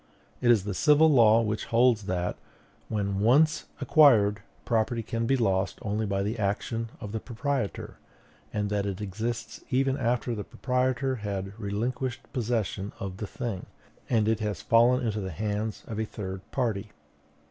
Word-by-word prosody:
It 120 - +3
is 115 -5 +5
the 100 0 -3
civil 150 - +5
law 115 -4 +6
which 110 0 -2
holds 115 -3 +3
that, 90 -1 -1 0.5
when 100 -2 -1
once 140 +9 +4
acquired, 120 -8 +5 0.2
property 115 0 0
can 115 +1 -2
be 135 - +3
lost 95 -5 +1
only 105 +1 -1
by 100 0 0
the 110 +3 -3
action 115 +3 -1
of 105 - -7
the 110 - -2
proprietor, 125 -1 -3 0.5
and 105 -1 -2
that 100 -1 0
it 95 -1 -4
exists 110 +4 -4
even 135 +1 +1
after 120 -1 0
the 105 -2 -4
proprietor 130 +2 -1
has 100 -3 -3
relinquished 120 +5 -3
possession 110 -5 -2
of 95 -1 -5
the 105 - -4
thing, 115 -7 -5 0.4
and 110 -3 +2
it 110 -1 +2
has 105 -4 -3
fallen 120 +2 +4
into 110 -1 -1
the 95 -2 -4
hands 105 +4 -3
of 110 -1 -5
a 110 - 0
third 95 -3 -6
party. 110 -5 -1
110 Hz, 160 wpm, -28 LUFS, 100-120 Hz, 0.5 s, law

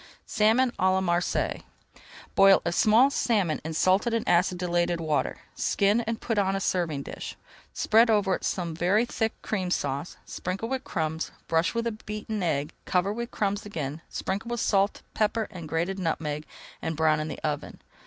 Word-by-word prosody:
SALMON 230 +4 +3
À 185 0 +4
LA 190 - +2
MARSEILLES 175 -1 0 0.7
Boil 195 0 +7
a 170 - +1
small 225 +9 +5
salmon 200 - +1
in 160 - -4
salted 195 +8 +3
and 230 - -2
acidulated 175 -1 +2
water. 155 -3 -1
Skin 205 +3 +2
and 230 0 -2
put 225 -3 -1
on 195 -1 +1
a - - 0
serving 170 -7 -1
dish. - - -7 0.4
Spread 225 +2 +4
over 205 -3 +3
it - - -3
some 170 -3 -2
very 190 +8 +2
thick 225 -2 -2
Cream 190 -4 -2
Sauce, 140 -1 -2
sprinkle 195 +6 -4
with 265 0 -2
crumbs, 160 0 -2 0.2
brush 165 +6 +1
with 230 -2 -2
beaten 215 0 -4
egg, 155 -3 -1
cover 185 +2 +1
with 235 +2 -4
crumbs 205 -1 -1
again, 155 -6 -5
sprinkle 205 +5 -3
with 240 0 -2
salt, 200 -2 +1
pepper, 220 +1 0
and 170 -4 -8
grated 175 +5 -1
nutmeg, 155 -3 -2 0.3
and 160 -1 -3
brown 155 -1 +3
in 155 - -2
the - - -5
oven. 150 -1 -3
190 Hz, 170 wpm, -27 LUFS, 165-215 Hz, 0.7 s, Boil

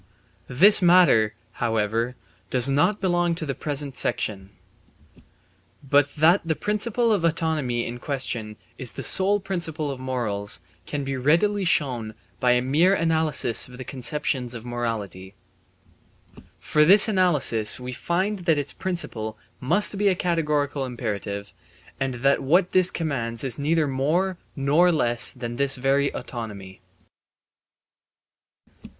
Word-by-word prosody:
This 190 +13 +6
matter, 175 - +4 0.3
however, 115 +1 -1 0.3
does 125 0 +4
not 145 +10 +1
belong 175 -2 0
to 160 - -5
the 140 - -3
present 145 -1 -5
section. 95 -5 -3 1.4
But 145 +1 +2
that 165 +5 +4
the 165 -1 -1
principle 215 - 0
of 195 -5 -1
autonomy 155 -7 -1
in 120 +1 -6
question 120 -6 -4 0.2
is 125 -3 -2
the - - -7
sole 200 +2 +1
principle 170 -6 -2
of 135 - -7
morals 115 -6 -2 0.3
can 145 -1 -4
be 135 0 -3
readily 170 +10 +1
shown 125 -10 0 0.2
by 125 0 +3
mere 155 +9 +2
analysis 160 - +2
of 125 0 -13
the 130 - -7
conceptions 130 -1 -3
of 115 0 -9
morality. 105 -6 -5 1.2
For 150 - 0
by - - +6
this 200 +6 +7
analysis 155 - +2
we 125 0 -7
find 190 - -2
that 170 -3 +1
its 145 -1 -2
principle 115 -12 -4 0.2
must 190 +11 +2
be 205 - +2
a 190 - +3
categorical 150 -5 -1
imperative 100 -5 -5 0.5
and 135 -2 -2
that 140 - +3
what 175 +7 +2
this 185 -1 +4
commands 120 -8 -3
is 130 -2 -4
neither 155 +2 +1
more 165 +8 -1 0.2
nor 150 +6 +3
less 120 -7 +3
than 120 -2 -7
this 140 0 +4
very 135 +2 +1
autonomy. 100 -6 -8
140 Hz, 130 wpm, -24 LUFS, 120-170 Hz, 1.4 s, this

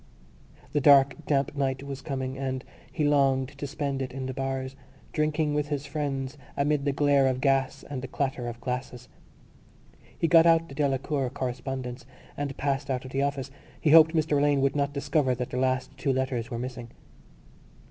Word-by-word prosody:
The 145 - +2
dark 140 -1 +6
damp 140 -1 +1
night 135 -1 -1
was 140 -1 -6
coming 130 -1 -3
and 130 -1 -3 0.3
he 155 - -1
longed 135 -3 +3
to 140 0 -7
spend 140 -1 -3
it 130 -1 -3
in 130 0 -5
the 130 - -3
bars, 135 0 -3 0.4
drinking 155 0 +1
with 145 0 0
his 145 -1 -3
friends 140 -1 -3 0.2
amid 145 0 +1
the 140 - +2
glare 140 -1 +3
of 130 -1 0
gas 135 0 +1
and 135 -3 -5
the 130 - -5
clatter 135 -2 -2
of 120 0 -6
glasses. 125 0 -5 1.1
He 165 - +1
got 165 0 +6
out 165 0 +4
the - - -9
Delacour 135 -1 0
correspondence 125 -1 -5 0.3
and 140 -1 -4
passed 140 0 -1
out 130 -1 -2
of 130 - -8
the 135 - 0
office. 140 -1 -2 0.3
He 150 - +2
hoped 160 +1 +8
Mr 150 -2 +2
Alleyne 145 -1 +3
would 135 +1 +1
not 140 0 +1
discover 140 -2 +1
that 125 0 -4
the - - -3
last 130 0 0
two 140 - +1
letters 130 -3 -1
were 120 - -4
missing. 125 -1 -6
135 Hz, 185 wpm, -27 LUFS, 130-145 Hz, 1.1 s, hoped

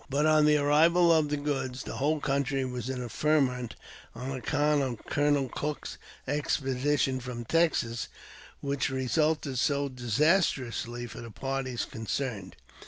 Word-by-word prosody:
IBut, 145 +3 +2
on 155 -1 +5
the 150 0 +5
arrival 165 +4 +5
of 155 -2 +3
the 150 - 0
goods, 135 -3 -2
the - - -6
whole 150 +3 +1
country 135 -1 0
was 125 0 -4
in 125 -1 -3
a - - -5
ferment 125 -3 +1 0.4
on 125 +3 -5
account 145 +3 +1
of 125 -5 -4
Colonel 145 -2 +1
Cook's 150 +3 -4 0.3
expedition 135 -1 0
from 120 -2 -6
Texas, 140 -6 +1 0.5
which 140 0 -1
resulted 135 +1 0
so 140 +1 +1
disastrously 125 - 0
for 120 - -9
the 115 - -8
parties 135 +1 -3
concerned. 110 -3 -4
135 Hz, 140 wpm, -29 LUFS, 125-150 Hz, 0.5 s, on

